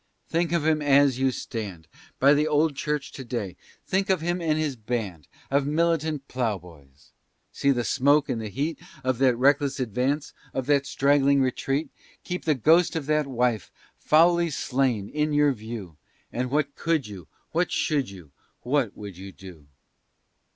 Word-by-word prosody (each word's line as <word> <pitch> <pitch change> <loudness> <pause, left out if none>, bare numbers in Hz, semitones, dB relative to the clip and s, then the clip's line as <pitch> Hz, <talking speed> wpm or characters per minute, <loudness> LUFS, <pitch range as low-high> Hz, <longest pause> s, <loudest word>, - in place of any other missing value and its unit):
Think 170 0 0
of 170 -3 +1
him 155 -1 +2
as 140 -2 +4
you 135 0 +3
stand 100 -9 -6 0.3
By 140 +2 +6
the 150 +1 +2
old 150 0 +2
church 150 0 -2
to 135 - -8
day; 110 -7 -4 0.3
think 195 +1 0
of 190 -2 +3
him 175 +2 -2
and 155 -2 +1
his 155 -4 -1
band 105 - -4 0.2
Of 140 0 +2
militant 155 -2 0
ploughboys! 85 - -5 0.4
See 140 - 0
the 125 -3 +2
smoke 145 +4 +3
and 115 - -2
the 110 - -5
heat 145 - -3 0.2
Of 130 -1 0
that 130 -2 +4
reckless 140 +1 +2
advance, 130 +5 -1 0.2
of 130 - -1
that 140 0 +2
straggling 140 0 +3
retreat! 135 +3 -1 0.3
Keep 180 0 -5
the 155 -2 +3
ghost 160 +8 +4
of 160 -4 -2
that 150 0 +1
wife, 125 -5 0 0.3
foully 170 +2 +4
slain, 125 -7 0
in 150 +3 -1
your 145 -1 +4
view, 110 - -8 0.4
And 125 +1 -2
what 145 0 0
could 160 -5 0
you, 100 -6 -10 0.2
what 175 +2 0
should 145 -6 0
you, 90 -7 -13 0.3
what 125 -4 0
would 100 -4 -8
you 95 +1 -8
do? 90 -7 -13
135 Hz, 165 wpm, -25 LUFS, 115-150 Hz, 0.4 s, By